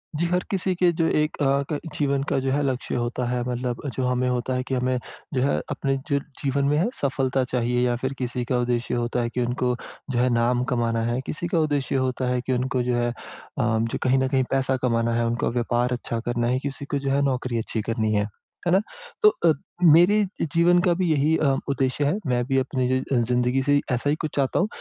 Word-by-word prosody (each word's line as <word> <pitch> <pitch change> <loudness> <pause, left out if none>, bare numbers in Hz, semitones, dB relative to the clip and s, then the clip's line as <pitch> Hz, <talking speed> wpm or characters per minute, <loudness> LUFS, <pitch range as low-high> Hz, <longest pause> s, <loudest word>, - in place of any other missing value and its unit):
जी, 170 +3 0
हर 180 +1 0
किसी 190 -1 +1
के 175 0 +3
जो 165 - +3
एक 150 -1 0
अ, 140 0 +2
क 150 - -1 0.2
जीवन 140 -2 +1
का - - +1
जो 135 0 -1
है, 145 +2 +1
लक्ष्य 130 -2 -2
होता 120 +1 -1
है 125 0 -1
मतलब 125 0 -3
जो 130 - -1
हमें 125 0 +1
होता 125 +1 -1
है 125 0 -1
कि - - -3
हमें 125 0 0 0.4
जो 130 - +1
है, 140 +2 +2
अपने 135 0 -1
जो 140 -1 +2 0.2
जीवन 140 0 +1
में 145 +1 +2
है, 170 - +2
सफलता 135 -1 +1
चाहिए 125 0 +1
या 120 -1 +1
फिर 130 +2 -3
किसी 125 -1 -2
का 125 0 0
उद्देश्य 120 0 -1
होता 120 0 0
है 120 - -1
कि 125 - -2
उनको 125 +1 0 0.4
जो 120 - 0
है, 125 +1 +3
नाम 120 +1 +2
कमाना 115 -1 0
है। 120 - -1
किसी 170 +3 -3
का 170 -1 +1
उद्देश्य 145 -4 0
होता 130 -1 0
है 125 0 0
कि 130 - 0
उनको 125 0 0
जो 125 0 0
है 120 0 +1
अ, - - -4 0.5
जो 115 -1 0
कहीं 130 +1 +3
न 130 - +1
कहीं 130 -1 +2
पैसा 135 0 +1
कमाना 115 -2 +1
है, 120 0 +1
उनको 120 0 0
व्यापार 120 +1 0
अच्छा 120 -1 -3
करना 120 0 0
है, 125 +2 +1
किसी 140 +1 -5
को 145 - +1
जो 135 0 -2
है, 140 +1 +2
नौकरी 130 -3 -1
अच्छी 110 0 -2
करनी 110 0 -1
है। 105 0 +1 0.4
है - - +3
ना? 190 - +5 0.4
तो 425 - +9 0.2
अ, 165 - +7 0.4
मेरे 175 +6 +6 0.4
जीवन 175 +1 +5
का 175 - +4
भी 185 +2 0
यही 155 +1 +3
अ, 140 -4 +2
उद्देश्य 135 +1 0
है। 150 +8 +1
मैं 125 -1 +1
भी 135 +1 0
अपनी 130 -1 -1
य 130 - +2
अ, - - +3
ज़िंदगी 125 +2 +2
से 145 +1 +3
ऐसा 125 +3 0
ही 145 - +2
कुछ 155 -3 -3
चाहता 135 -2 +1
हूँ। 185 - +2
130 Hz, 240 wpm, -24 LUFS, 120-140 Hz, 0.5 s, तो